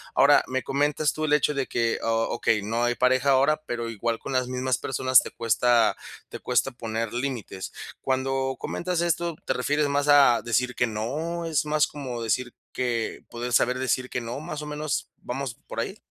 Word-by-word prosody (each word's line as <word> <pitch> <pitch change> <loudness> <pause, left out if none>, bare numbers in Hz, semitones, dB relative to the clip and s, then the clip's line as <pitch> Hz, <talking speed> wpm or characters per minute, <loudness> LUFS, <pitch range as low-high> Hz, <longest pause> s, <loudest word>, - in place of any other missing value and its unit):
Ahora - - +6
me 130 -1 -2
comentas 145 +3 +1
tú 155 - -2
el 150 - +1
hecho 150 0 +3
de 140 -2 -2
que 115 -1 0
ah, - - -3 0.2
okey, 110 -2 +1
no 115 +3 -1
hay 120 0 +1
pareja 130 +3 +3
ahora, 140 +4 +3
pero 120 -1 -3
igual 115 +1 -2
con - - -7
las 130 -1 +1
mismas 130 0 0
personas 130 -1 +4
te - - -7
cuesta 115 0 +2 0.3
te - - -7
cuesta 135 - +1
poner 115 -2 -4
límites. 120 -7 -4 0.3
Cuando 135 0 0
comentas 180 -1 -2
esto, 170 -1 0
¿te - - +1
refieres 145 +4 +1
más 145 +1 +1
a 140 -5 +6
decir 125 +1 0
que 125 - +2
no 150 +11 -3
es 155 -3 0
más 150 0 +3
como 130 -5 -6
decir 120 +2 -1 0.2
que 120 -3 -2
poder 120 +1 -4
saber 125 +2 +3
decir 130 0 0
que 125 - -3
no 120 +3 -5
más 155 -1 -6
o - - -6
menos 150 -1 -3
vamos 130 0 -4
por - - -5
ahí? - - -3
130 Hz, 195 wpm, -26 LUFS, 120-145 Hz, 0.3 s, Ahora